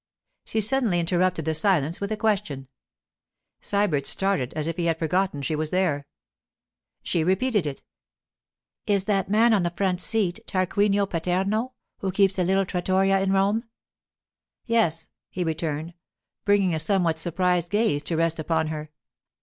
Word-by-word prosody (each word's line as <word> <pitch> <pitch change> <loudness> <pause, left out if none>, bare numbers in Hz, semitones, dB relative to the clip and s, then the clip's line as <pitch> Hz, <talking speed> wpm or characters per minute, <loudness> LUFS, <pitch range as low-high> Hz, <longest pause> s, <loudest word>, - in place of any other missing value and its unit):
She 220 - -1
suddenly 225 -5 +3
interrupted 175 -1 0
the 160 - 0
silence 165 -2 +1
with 200 +1 -3
a 215 - -1
question. 200 -12 -1 0.9
Sybert 185 -9 0
started 195 -10 +2
at 155 -1 -1
if 165 0 -2
he 175 - -2
had 165 -1 +1
forgotten 165 -2 -1
she 155 +4 -1
were 155 +1 -2
there. 155 -5 0 1.0
She 170 - 0
repeated 190 +1 +1
it: 140 - -6 1.0
'Is 200 -2 +2
that 195 -3 0
man 225 +3 +4
on 205 - +3
the 175 - 0
front 180 0 -1
seat 205 -4 +1
Tarquinio 200 +2 +1
Paterno 190 +8 -1 0.3
who 190 - -2
keeps 195 0 +2
a - - +3
little 190 +2 +2
trattoria 190 +2 +1
in 195 0 0
Rome?' 200 +4 +1 1.0
'Yes,' 195 -9 +1 0.2
he 185 - -3
returned, 160 0 -3 0.5
bringing 200 -3 +3
a 160 - -1
somewhat 165 -1 +1
surprised 175 +1 0
gaze 205 -9 +1
to 165 +1 -2
rest 165 0 0
upon 160 0 0
her. 155 -1 -6
185 Hz, 150 wpm, -25 LUFS, 165-200 Hz, 1.0 s, man